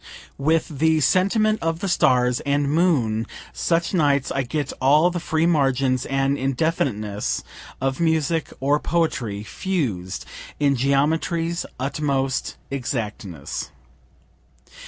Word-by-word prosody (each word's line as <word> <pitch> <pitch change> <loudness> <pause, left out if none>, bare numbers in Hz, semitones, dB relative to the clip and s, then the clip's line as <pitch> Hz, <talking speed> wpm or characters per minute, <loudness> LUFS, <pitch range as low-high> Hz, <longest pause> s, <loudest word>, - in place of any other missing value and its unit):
With 155 0 0
the 160 0 +3
sentiment 215 - +2
of 165 0 0
the 195 - -3
stars 125 -8 +3
and 140 0 0
moon 130 -10 +2 0.3
such 170 +2 0
nights 145 -6 +2
I 135 - 0
get 140 +2 -3
all 150 +6 +5
the 175 - -2
free 160 0 0
margins 135 -5 +2
and 135 +1 0
indefiniteness 130 -7 -1 0.4
of 135 0 -1
music 160 -1 +1
or 145 +2 +2
poetry, 125 -13 -1
fused 110 - -3 0.3
in 140 -1 +3
geometry's 160 +6 0
utmost 135 -1 -1 0.2
exactness. 105 - -4
140 Hz, 110 wpm, -23 LUFS, 130-165 Hz, 0.4 s, all